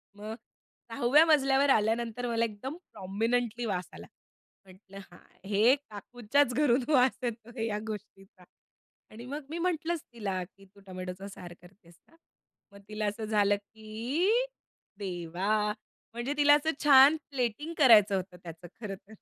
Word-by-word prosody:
मग 215 Hz, +1 st, -7 dB, 0.6 s
6व्या 250 Hz, +7 st, +4 dB
मजल्यावर 280 Hz, -3 st, +3 dB
आल्यानंतर 230 Hz, +1 st, +1 dB
मला 230 Hz, -1 st, +1 dB
एकदम 230 Hz, +8 st, -7 dB, 0.2 s
प्रॉमिनेंटली 230 Hz, +4 st, -2 dB
वास 180 Hz, -4 st, -3 dB
आला. -, -, -11 dB, 0.6 s
म्हटलं, 190 Hz, +1 st, -16 dB
"हां, 175 Hz, -, -15 dB, 0.3 s
हे 220 Hz, +6 st, +4 dB
काकूच्याच 245 Hz, +1 st, -1 dB
घरून 260 Hz, -1 st, +2 dB
वास 260 Hz, -3 st, +4 dB
येतोय 230 Hz, 0 st, -4 dB
या 210 Hz, -1 st, -2 dB
गोष्टीचा." 195 Hz, -3 st, -10 dB, 0.7 s
आणि 230 Hz, +3 st, -10 dB
मग 285 Hz, +3 st, -6 dB
मी 325 Hz, -, -5 dB
म्हटलंच 340 Hz, -2 st, -1 dB
तिला 195 Hz, -5 st, -3 dB
की, 195 Hz, +1 st, -17 dB
"तू 195 Hz, +1 st, -22 dB
टोमॅटोचा 185 Hz, +1 st, -7 dB
सार 180 Hz, -3 st, -10 dB
करतेस 175 Hz, -1 st, -19 dB
ना?" 325 Hz, -, -24 dB, 0.6 s
मग 200 Hz, -, -14 dB
तिला 210 Hz, 0 st, -3 dB
असं 210 Hz, +2 st, -4 dB
झालं 205 Hz, -1 st, +2 dB
की 220 Hz, -, -3 dB, 0.7 s
देवा 195 Hz, +3 st, -1 dB, 0.4 s
म्हणजे 240 Hz, +4 st, -3 dB
तिला 290 Hz, 0 st, +6 dB
असं 315 Hz, +2 st, 0 dB
छान 280 Hz, +1 st, +8 dB, 0.2 s
प्लेटिंग 265 Hz, +5 st, -2 dB
करायचं 220 Hz, -8 st, +6 dB
होतं 185 Hz, -1 st, -5 dB
त्याचं 170 Hz, +1 st, -10 dB
खरं 200 Hz, -2 st, -5 dB
तर. 205 Hz, +2 st, -18 dB
220 Hz, 140 wpm, -29 LUFS, 200-260 Hz, 0.7 s, छान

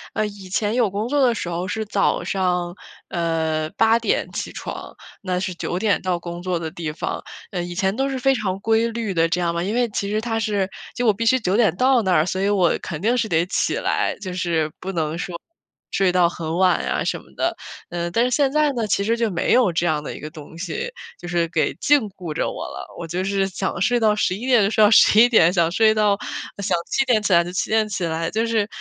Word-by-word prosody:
呃， 215 Hz, -, +1 dB
以 200 Hz, -2 st, -8 dB
前 205 Hz, +3 st, 0 dB
有 240 Hz, -4 st, +2 dB
工 205 Hz, +4 st, -3 dB
作 280 Hz, +1 st, +3 dB
的 240 Hz, -, +3 dB
时 175 Hz, -, -4 dB
候 175 Hz, +2 st, -3 dB
是 220 Hz, +4 st, -3 dB
早 205 Hz, -1 st, +1 dB
上， 180 Hz, -2 st, -1 dB, 0.3 s
呃， 160 Hz, -2 st, -1 dB
8 225 Hz, +1 st, +4 dB
点 230 Hz, -, -1 dB
起 -, -, -4 dB
床， -, -, -7 dB, 0.3 s
那 185 Hz, -3 st, -1 dB
是 185 Hz, 0 st, -3 dB
9 175 Hz, -, -3 dB
点 205 Hz, +2 st, +1 dB
到 180 Hz, -2 st, -1 dB
工 170 Hz, 0 st, -7 dB
作 180 Hz, -1 st, -1 dB
的 165 Hz, -1 st, -4 dB
地 165 Hz, -2 st, -4 dB
方。 150 Hz, -, -4 dB, 0.3 s
呃， 180 Hz, -, -2 dB
以 175 Hz, 0 st, -6 dB
前 190 Hz, +2 st, 0 dB
都 270 Hz, +3 st, 0 dB
是 270 Hz, -, -3 dB
非 270 Hz, +1 st, +3 dB
常 195 Hz, -5 st, -2 dB
规 225 Hz, +2 st, +2 dB
律 225 Hz, -3 st, -3 dB
的， 165 Hz, -1 st, +3 dB
这 170 Hz, +2 st, -1 dB
样 170 Hz, -1 st, 0 dB
嘛。 170 Hz, -, -2 dB
因 200 Hz, +4 st, -2 dB
为 245 Hz, 0 st, +2 dB
其 200 Hz, -1 st, -3 dB
实 215 Hz, +1 st, 0 dB
它 225 Hz, -1 st, -2 dB
是 205 Hz, -4 st, 0 dB, 0.3 s
就 245 Hz, -, -1 dB
我 215 Hz, -, +5 dB
必 230 Hz, +4 st, -3 dB
须 260 Hz, +3 st, +4 dB
9 195 Hz, -4 st, 0 dB
点 215 Hz, -8 st, +3 dB
到 255 Hz, +3 st, +3 dB
那 190 Hz, -2 st, +1 dB
儿， 155 Hz, -2 st, +4 dB
所 185 Hz, +1 st, -2 dB
以 200 Hz, -, +2 dB
我 185 Hz, -5 st, +2 dB
肯 160 Hz, -3 st, -6 dB
定 235 Hz, +5 st, +2 dB
是 230 Hz, -, 0 dB
得 165 Hz, -3 st, +2 dB
起 -, -, 0 dB
来， -, -, 0 dB
就 185 Hz, -3 st, -5 dB
是 170 Hz, -4 st, -1 dB
不 190 Hz, -, -5 dB
能 160 Hz, -3 st, -2 dB
说 175 Hz, 0 st, -5 dB, 0.6 s
睡 195 Hz, -2 st, +2 dB
到 180 Hz, -1 st, +4 dB
很 165 Hz, -1 st, -4 dB
晚 185 Hz, -1 st, +3 dB
呀 -, -, -1 dB
什 -, -, -1 dB
么 -, -, -18 dB
的。 -, -, 0 dB, 0.3 s
呃， 175 Hz, 0 st, -3 dB
但 230 Hz, +7 st, +2 dB
是 250 Hz, -, -1 dB
现 275 Hz, +1 st, +2 dB
在 300 Hz, 0 st, +2 dB
呢， 235 Hz, -3 st, -1 dB
其 200 Hz, -, +1 dB
实 230 Hz, +3 st, +1 dB
就 230 Hz, -1 st, +1 dB
没 170 Hz, -, 0 dB
有 245 Hz, -6 st, +4 dB
这 165 Hz, +1 st, 0 dB
样 155 Hz, -3 st, +1 dB
的 -, -, -6 dB
一 -, -, -9 dB
个 150 Hz, -, -6 dB
东 155 Hz, 0 st, -12 dB
西， 460 Hz, -, -4 dB, 0.3 s
就 175 Hz, -, -8 dB
是 170 Hz, -1 st, 0 dB
给 155 Hz, -4 st, 0 dB
禁 290 Hz, 0 st, +5 dB
锢 180 Hz, -5 st, -7 dB
着 -, -, -1 dB
我 -, -, -6 dB
了。 -, -, -7 dB
我 -, -, -5 dB
就 175 Hz, +3 st, -2 dB
是 195 Hz, 0 st, 0 dB
想 190 Hz, 0 st, -3 dB
睡 245 Hz, +4 st, +2 dB
到 215 Hz, -2 st, +3 dB
11 210 Hz, +2 st, -1 dB
点 245 Hz, -5 st, +4 dB
就 -, -, +1 dB
睡 215 Hz, -, +4 dB
到 -, -, +5 dB
11 225 Hz, +1 st, +7 dB
点， 175 Hz, -8 st, +5 dB
想 170 Hz, -3 st, +3 dB
睡 220 Hz, +4 st, +4 dB
到 210 Hz, -2 st, +2 dB, 0.5 s
想 180 Hz, -2 st, +1 dB
7 270 Hz, -, +3 dB
点 240 Hz, -4 st, +3 dB
起 210 Hz, -, 0 dB
来 170 Hz, 0 st, +6 dB
就 175 Hz, -, -6 dB
7 185 Hz, -, -1 dB
点 220 Hz, 0 st, +2 dB
起 185 Hz, -3 st, -3 dB
来， 165 Hz, 0 st, -2 dB
就 225 Hz, +3 st, 0 dB
是 220 Hz, -3 st, +1 dB
195 Hz, 260 characters per minute, -22 LUFS, 175-225 Hz, 0.6 s, 11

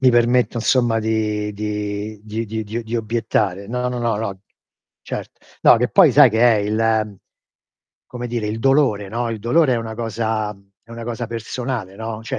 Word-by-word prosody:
Mi 130 Hz, -, +5 dB
permetto 120 Hz, +1 st, +3 dB
insomma 120 Hz, -1 st, +2 dB
di 105 Hz, -1 st, -1 dB
di 105 Hz, 0 st, -4 dB
di 110 Hz, +1 st, -3 dB
di 110 Hz, +1 st, -4 dB
di 110 Hz, +3 st, -4 dB
di 115 Hz, +2 st, -3 dB
obiettare 110 Hz, -4 st, -1 dB
no, 125 Hz, +1 st, -1 dB
no, 125 Hz, 0 st, -3 dB
no, 120 Hz, -2 st, 0 dB
no, 100 Hz, -3 st, -4 dB, 0.6 s
cert -, -, -7 dB, 0.2 s
no, -, -, +8 dB
che -, -, +1 dB
poi -, -, +6 dB
sai -, -, +7 dB
che 110 Hz, +1 st, 0 dB
è 120 Hz, -2 st, +6 dB
il 110 Hz, 0 st, 0 dB, 0.9 s
come 120 Hz, -1 st, -6 dB
dire, 120 Hz, -2 st, -2 dB
il 110 Hz, +2 st, -3 dB
dolore, 130 Hz, -7 st, +2 dB
no, 115 Hz, +2 st, -2 dB
il 115 Hz, -, -4 dB
dolore 130 Hz, +6 st, +3 dB
è -, -, 0 dB
una 115 Hz, -1 st, -4 dB
cosa 110 Hz, -2 st, -2 dB
mhmm, 100 Hz, 0 st, -25 dB
è 115 Hz, -, -20 dB
una 115 Hz, 0 st, -7 dB
cosa 120 Hz, 0 st, -4 dB
personale, 115 Hz, -3 st, -4 dB
no, 110 Hz, 0 st, -5 dB
cioè 115 Hz, -, -4 dB
110 Hz, 190 wpm, -20 LUFS, 105-120 Hz, 0.9 s, no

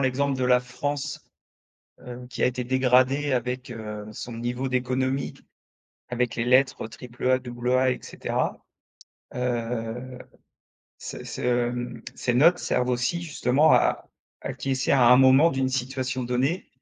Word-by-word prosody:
l'exemple 135 Hz, +1 st, +1 dB
de 130 Hz, -, 0 dB
la 125 Hz, 0 st, +4 dB
France, 145 Hz, +3 st, -4 dB, 0.7 s
heu, 125 Hz, 0 st, -9 dB
qui -, -, -3 dB
a -, -, +6 dB
été 125 Hz, 0 st, -3 dB
dégradée 130 Hz, +2 st, +2 dB
avec, 125 Hz, +1 st, -2 dB
heu, 105 Hz, -2 st, -6 dB
son 120 Hz, +2 st, -7 dB
niveau 120 Hz, +3 st, -3 dB
d'économie, 130 Hz, +1 st, -1 dB, 0.8 s
avec 125 Hz, -1 st, -1 dB
les 115 Hz, -, -1 dB
lettres 130 Hz, -2 st, +3 dB
triple 120 Hz, +2 st, -6 dB
A, 130 Hz, 0 st, +4 dB
double 125 Hz, -1 st, -4 dB
A, 130 Hz, 0 st, +3 dB
et -, -, -3 dB
cetera. -, -, -3 dB, 0.8 s
Heu, 125 Hz, 0 st, -3 dB, 0.8 s
ces -, -, -8 dB
ce, 120 Hz, -1 st, 0 dB
mmh, 120 Hz, 0 st, -5 dB
ces 120 Hz, -, -1 dB
notes 170 Hz, +7 st, +5 dB
servent 125 Hz, -, 0 dB
aussi 125 Hz, +8 st, -1 dB
justement 150 Hz, -2 st, +2 dB
à -, -, +2 dB, 0.4 s
à -, -, -3 dB
acquiescer 135 Hz, -1 st, -2 dB
à 130 Hz, -3 st, +5 dB
un 125 Hz, +1 st, +8 dB
moment 135 Hz, +5 st, +6 dB
d'une 135 Hz, -1 st, 0 dB
situation 130 Hz, 0 st, -2 dB
donnée, 130 Hz, +9 st, -1 dB
125 Hz, 145 wpm, -25 LUFS, 125-130 Hz, 0.8 s, un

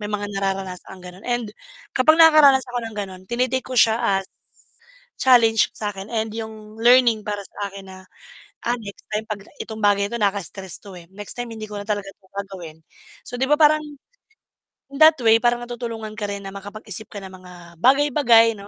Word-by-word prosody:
may 210 Hz, -, -4 dB
mga 205 Hz, -1 st, -2 dB
nararanasang 190 Hz, -1 st, -4 dB
gano'n. 180 Hz, +2 st, -12 dB
And 240 Hz, -2 st, -1 dB, 0.5 s
kapag 310 Hz, +5 st, +5 dB
nakakaranas 295 Hz, -5 st, +7 dB
ako 245 Hz, 0 st, -3 dB
ng 220 Hz, -, -12 dB
gano'n, 190 Hz, -2 st, -6 dB
tine-take 255 Hz, +2 st, 0 dB
ko 260 Hz, -, -6 dB
siya 225 Hz, +1 st, +5 dB, 0.2 s
as 195 Hz, -, -7 dB, 0.9 s
challenge 235 Hz, -4 st, +5 dB
sa'kin 205 Hz, -1 st, -5 dB
and 220 Hz, -1 st, -1 dB
'yong 220 Hz, -1 st, -8 dB
learning 235 Hz, -3 st, +5 dB
para 205 Hz, -1 st, -3 dB
sa 200 Hz, -1 st, -6 dB
akin 195 Hz, -1 st, -10 dB
na, 190 Hz, 0 st, -11 dB, 0.7 s
"Ah, 240 Hz, +1 st, 0 dB
next 200 Hz, -2 st, -10 dB
time 215 Hz, +1 st, -1 dB
'pagka 205 Hz, -1 st, -7 dB
itong 220 Hz, -1 st, -8 dB
bagay 200 Hz, -1 st, +3 dB
ito, 235 Hz, -, -1 dB
nakaka-stress 195 Hz, -3 st, -2 dB
'to, 200 Hz, -2 st, -12 dB
eh. 175 Hz, -, -11 dB
Next 205 Hz, +1 st, -5 dB
time 245 Hz, -1 st, -5 dB
hindi 215 Hz, -1 st, -7 dB
ko 210 Hz, -, -7 dB
na -, -, -7 dB
talaga 205 Hz, -2 st, -2 dB
'to 190 Hz, -, -28 dB
gagawin." 190 Hz, -5 st, -8 dB, 0.5 s
So, -, -, -8 dB
'di 265 Hz, -, +3 dB
ba 295 Hz, -, +5 dB
parang, 305 Hz, 0 st, +5 dB, 1.1 s
in 275 Hz, -, -6 dB
that 315 Hz, 0 st, +8 dB
way, 225 Hz, 0 st, +6 dB
parang 240 Hz, 0 st, +1 dB
natutulungan 230 Hz, -3 st, -6 dB
ka 205 Hz, -, -2 dB
rin 200 Hz, 0 st, -5 dB
na 195 Hz, -, -6 dB
makapag-isip 210 Hz, +1 st, -7 dB
ka 205 Hz, -, -9 dB
ng 190 Hz, -, -9 dB
mga 180 Hz, -, -13 dB, 0.3 s
bagay, 275 Hz, +5 st, +4 dB
bagay, 230 Hz, -5 st, +5 dB
'no, 200 Hz, 0 st, -11 dB
215 Hz, 195 wpm, -22 LUFS, 200-240 Hz, 1.1 s, that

